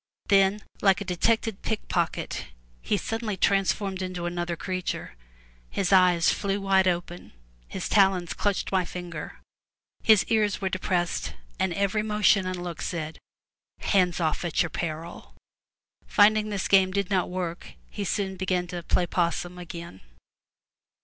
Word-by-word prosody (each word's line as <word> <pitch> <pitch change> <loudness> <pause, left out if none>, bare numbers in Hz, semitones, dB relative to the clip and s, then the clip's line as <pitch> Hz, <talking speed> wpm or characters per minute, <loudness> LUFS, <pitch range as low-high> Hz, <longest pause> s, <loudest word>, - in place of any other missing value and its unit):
Then, 195 +1 +4 0.2
like 195 -3 +4
a - - -5
detected 220 +3 0
pick 220 -2 -3
pocket, 170 -2 -2 0.4
he - - 0
was - - -3
suddenly 225 -3 -3
transformed 195 0 +1
into 185 -2 -4
another 175 0 -2
creature. 185 - -4 0.6
His 195 0 0
eyes 180 -2 +5
flew 200 0 -1
wide 195 -1 +3
open, 175 - -3 0.3
his - - -4
talons 190 -4 +3
clutched 205 -2 -1
my 190 -1 +2
finger, 175 -3 -7 0.6
his 215 -3 +6
ears 215 -3 +2
were 190 - -1
depressed, 175 - -1 0.2
and 190 -1 +1
every 200 +2 +1
motion 210 -2 +3
and 180 -1 -4
look 175 -2 -6
said, 160 -2 -4 0.6
"Hands 185 -3 +2
off, 160 0 0
at 175 -1 +1
your 165 - -5
peril.'* 165 0 -5 0.7
Finding 215 +1 +4
this 200 -2 -2
game 190 -1 +5
did 200 0 -2
not 185 -3 +1
work, 175 - -5
he 200 - -5
soon 195 -1 -2
began 185 -1 0
to 175 0 -4
"play 175 +1 +1
'possum*' 175 +1 -1
again. 170 - -8
185 Hz, 145 wpm, -26 LUFS, 175-200 Hz, 0.7 s, his